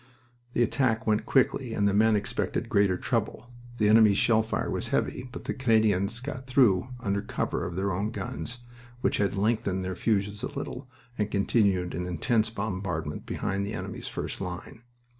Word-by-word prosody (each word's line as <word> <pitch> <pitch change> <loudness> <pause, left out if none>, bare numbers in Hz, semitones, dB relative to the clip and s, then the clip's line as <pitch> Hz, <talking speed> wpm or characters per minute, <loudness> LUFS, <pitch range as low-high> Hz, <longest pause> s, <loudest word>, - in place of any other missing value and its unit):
The 120 - +3
attack 120 -2 +1
went 110 -1 +1
quickly 130 -2 +2
and 100 - +2
the 100 - +2
men 110 +2 +4
expected 105 - -2
greater 100 -2 +3
trouble. 115 +3 -2 0.3
The 105 - +3
enemy's 105 -2 +6
shell 110 0 +4
fire 110 - -2
was - - -2
heavy, 125 - -1
but - - -8
the - - -2
Canadians 110 -4 +2
got 130 -1 -6
through 125 -7 +4
under 100 -1 0
cover 105 - -2
of - - -6
their 95 +1 0
own 100 +4 -1
guns, 120 +1 -5 0.4
which - - +1
had 100 0 +1
lengthened 100 -2 0
their 95 0 -3
fuses 105 0 0
a - - -2
little 130 - -6 0.3
and 105 -1 +1
continued 100 -3 +2
an 90 +2 -3
intense 110 - +1
bombardment 95 -8 -4
behind 95 +1 -2
the 100 +2 -4
enemy's - - -5
first - - -4
line. 90 +4 -6
105 Hz, 175 wpm, -28 LUFS, 95-115 Hz, 0.4 s, enemy's